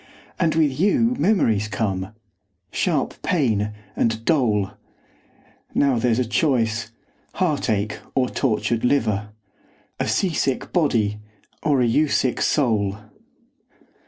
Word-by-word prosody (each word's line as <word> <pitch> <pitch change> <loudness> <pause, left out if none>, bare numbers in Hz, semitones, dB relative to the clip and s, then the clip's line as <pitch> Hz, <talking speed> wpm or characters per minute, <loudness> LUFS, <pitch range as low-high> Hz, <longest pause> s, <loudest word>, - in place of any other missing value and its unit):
And 165 -3 +2
with 150 -4 +1
you 230 +6 +3
memories 115 - +2
come, 95 -1 -3 0.6
sharp - - -1
pain, 110 - +1 0.3
and 115 0 0
dole. 110 -11 +2 1.0
Now 135 -4 +3
there's 115 -1 +2
a 125 - +1
choice 115 -2 0 0.4
heartache 115 - 0 0.2
or 130 -1 +2
tortured 115 -3 -1
liver! 110 -6 +1 0.7
A - - -1
sea 185 -4 +1
sick 135 -3 -1
body, 115 - +1 0.4
or 145 -4 +2
a - - +3
you 145 +7 +3
sick 130 -3 0
soul! 110 -8 +1
120 Hz, 110 wpm, -22 LUFS, 110-145 Hz, 1.0 s, you